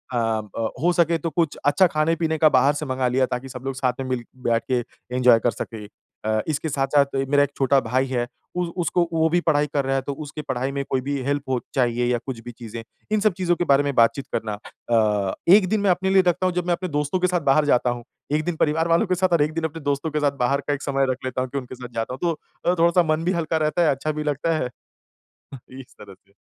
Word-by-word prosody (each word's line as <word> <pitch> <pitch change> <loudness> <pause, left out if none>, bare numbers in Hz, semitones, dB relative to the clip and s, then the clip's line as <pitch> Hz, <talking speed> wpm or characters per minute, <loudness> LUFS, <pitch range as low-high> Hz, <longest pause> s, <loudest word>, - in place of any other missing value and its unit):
ब 110 -1 -1
हो 175 +2 +3
सके 170 -1 +2
तो 165 +1 -3
कुछ 165 -2 0
अच्छा 180 +6 +5
खाने-पीने 160 0 0
का 155 0 +5
बाहर 135 +1 +4
से 150 +1 -4
मंगा 130 -2 -1
लिया 130 +1 +2
ताकि 130 +1 -5
सब 125 -1 -9
लोग 135 -1 -3
साथ 130 -1 0
में 135 - -3
मिल-बैठ 120 -1 -2
के 125 - +3 0.4
एन्जॉय 125 -2 +5
कर 120 - +1
सकें। 110 -3 -7 0.4
अ, 110 0 +1
इसके 155 +1 -2
साथ-साथ 140 0 +1
मेरा 145 0 +4
1 145 - -1
छोटा 135 0 +3
भाई 130 +2 0
है 120 -2 -1 0.3
उ 180 - 0 0.2
उसको 170 +1 +1
वो 160 0 +3
भी 175 +2 +2
पढाई 150 -2 +3
कर 140 -2 +1
रहा 135 0 0
है 135 - +1
तो 140 +2 -4
उसकी 145 +1 -7
पढाई 130 -2 -2
में 140 0 -2
कोई 130 - 0
भी 140 +2 -2
हेल्प 140 +1 -1
हो 130 -2 +1 0.2
चाहिए 120 -2 +1
या 120 - +2
कुछ 130 -4 -5
भी 120 - -7
चीज़ें, 115 -1 -8 0.3
इन 215 - +3
सब 215 -2 +3
चीज़ों 175 -2 +1
के 175 - -1
बारे 140 -1 +4
में 140 -1 -1
बातचीत 115 +4 +3
करना। 110 -1 -2 0.4
अ, 105 -4 +2 0.2
1 205 -3 +4
दिन 215 +1 +1
मैं 200 - +2
अपने 185 +2 0
लिए 190 0 +5
रखता 175 +1 +1
हूँ 185 - +1
जब 180 -1 -1
मैं 175 - +3
अपने 180 +1 -3
दोस्तों 150 +3 -1
के 185 - +2
साथ 180 -1 0
बाहर 150 +2 +3
जाता 125 -3 +3
हूँ, 120 0 -4 0.3
1 155 +1 +1
दिन 175 - -1
परिवार 160 +1 +1
वालों 170 +6 +3
के 185 - +1
साथ 185 0 +1
और 165 - +4
1 150 +1 +1
दिन 165 0 -3
अपने 160 0 -4
दोस्तों 145 +2 -1
के 150 - 0
साथ 145 -1 +2
बाहर 135 +3 +1
का 145 - +1
एक 145 - -4
समय 135 -1 +1
रख 125 - -3
लेता 130 0 -2
हूँ 130 - -3
कि 140 - -4
उनके 130 -1 -6
साथ 125 -1 -10
जाता 115 +2 -3
हूँ 130 - -7
तो 170 - +2 0.4
अ, - - +1
थोड़ा-सा 170 +1 +4
मन 155 +1 -2
भी 180 - +1
हल्का 165 -2 -1
रहता 165 +3 0
है, 165 - +4
अच्छा 140 +3 -2
भी 150 0 -4
लगता 150 +2 0
है। 125 - -2 1.1
इस 130 - -14
तरह 100 -1 -11
से। 100 +1 -33
140 Hz, 265 wpm, -23 LUFS, 125-165 Hz, 1.1 s, अच्छा